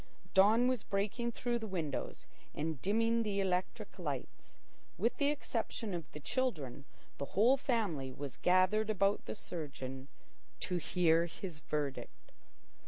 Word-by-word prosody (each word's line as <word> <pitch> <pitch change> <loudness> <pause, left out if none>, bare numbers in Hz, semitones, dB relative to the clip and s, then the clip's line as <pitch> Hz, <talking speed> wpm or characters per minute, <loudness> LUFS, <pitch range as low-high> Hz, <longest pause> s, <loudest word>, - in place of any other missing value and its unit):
Dawn 215 +6 +6
was 255 -4 +1
breaking 210 +4 -1
through 240 0 -1
the 220 - -5
windows 165 -8 -3 0.3
and 155 -2 -2
dimming 230 +3 +2
the 205 -3 0
electric 185 -1 -1
lights. - - -5 0.4
With 230 - +1
the 285 -1 +3
exception 230 -7 -2
of 165 -4 -5
the 150 - -7
children, 150 - -2 0.3
the 140 - -1
whole 235 +6 +7
family 210 - -1
was 135 0 -6
gathered 185 +4 +3
about 200 -1 +2
the - - -4
surgeon 135 -8 -5 0.5
to 180 - 0
hear 170 -1 +3
his 170 -1 -7
verdict. 145 -3 -4
190 Hz, 135 wpm, -35 LUFS, 155-225 Hz, 0.5 s, whole